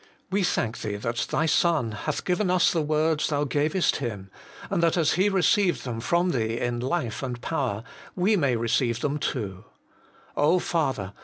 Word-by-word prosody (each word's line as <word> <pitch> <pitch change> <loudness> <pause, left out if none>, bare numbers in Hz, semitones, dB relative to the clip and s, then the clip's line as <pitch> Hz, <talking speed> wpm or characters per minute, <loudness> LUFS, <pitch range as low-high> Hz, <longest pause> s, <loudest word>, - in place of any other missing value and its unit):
We 200 +2 +2
thank 120 - -1
Thee 105 -1 -3
that 115 +3 -2
Thy 160 - +1
Son 160 -7 +2
hath 145 +8 -4
given 180 +2 +1
us 180 -1 +4
the 165 - +1
words 155 +1 +1
Thou 145 -1 0
gavest 150 +6 +1
Him, 105 -7 -5 0.4
and - - +1
that 170 +1 +2
as 160 -3 +3
He 190 +3 +3
received 195 -2 +2
them 120 -3 -4
from 175 +8 +1
Thee 115 -3 -1
in 120 -1 -1
life 125 -2 -2
and 125 -3 -4
power, 125 -7 -2 0.3
we 195 +4 +3
may 140 -9 +2
receive 115 +1 0
them 150 +1 -1
too. 100 -10 -3 1.0
Father 135 - -1
145 Hz, 170 wpm, -26 LUFS, 115-170 Hz, 1.0 s, us